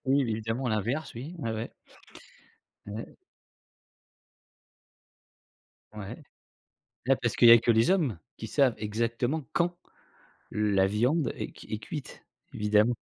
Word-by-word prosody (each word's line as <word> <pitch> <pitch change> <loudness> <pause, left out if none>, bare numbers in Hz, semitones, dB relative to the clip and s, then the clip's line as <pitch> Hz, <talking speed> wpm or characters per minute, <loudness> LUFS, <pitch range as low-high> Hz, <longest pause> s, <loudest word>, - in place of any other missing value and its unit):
Oui 135 +1 +3
évidemment 115 +2 -2
l'inverse, 115 +8 -1
oui. 140 +9 -7
Ouais, 115 -6 -2
ouais. 110 +1 -4 1.1
Ouais. 105 +3 -7 2.8
Ouais. 105 -2 -8 0.8
Bah, 135 0 +4
parce 115 - 0
qu'il 120 - +7
y - - +11
a 115 - +10
que 120 - +1
les 115 +4 +4
hommes 155 - +2 0.2
qui 110 - -6
savent 130 0 +3
exactement 115 +7 -1
quand 175 0 +1 0.8
la 100 -2 +2
viande 125 +7 +1
est - - -6
c - - -12
est 110 - -3
cuite 145 +6 -8 0.3
évidemment. 105 +3 +3
115 Hz, 125 wpm, -29 LUFS, 110-135 Hz, 2.8 s, y